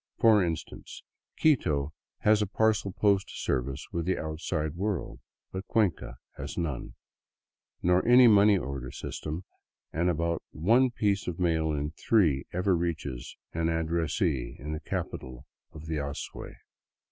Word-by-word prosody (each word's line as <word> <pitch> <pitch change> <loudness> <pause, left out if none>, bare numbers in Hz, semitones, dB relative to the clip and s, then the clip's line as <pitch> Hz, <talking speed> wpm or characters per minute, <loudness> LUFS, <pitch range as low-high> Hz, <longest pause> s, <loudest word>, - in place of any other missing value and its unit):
For 110 -4 +5
instance, 80 -2 -5 0.3
Quito 75 - +2 0.3
has 105 0 +4
a 105 - +1
parcel 110 -1 +1
post 100 0 +2
service 65 0 -2
with 85 0 -2
the 95 - +1
outside 80 0 -3
world, 100 +1 -3 0.3
but 95 +1 -6
Cuenca 95 - 0 0.2
has - - -6
none, 75 -7 -3 0.9
nor 90 +1 +4
any 125 +1 +8
money 105 -2 +6
order 70 -6 -4
system, 80 +7 -5 0.5
and 85 +2 +1
about 85 0 0
one 115 +11 +3
piece 100 -4 0
of 85 -2 -3
mail 80 -3 +1
in 75 0 -2
three 80 -8 +2
ever 90 +1 +1
reaches 80 -7 -3 0.2
an 80 0 0
addressee 80 -4 0
in 75 +3 -6
the 75 - -3
capital 65 -2 -5 0.3
of 80 0 -10
the 80 -1 -2
Azuay. 70 0 -5
85 Hz, 135 wpm, -29 LUFS, 75-100 Hz, 0.9 s, any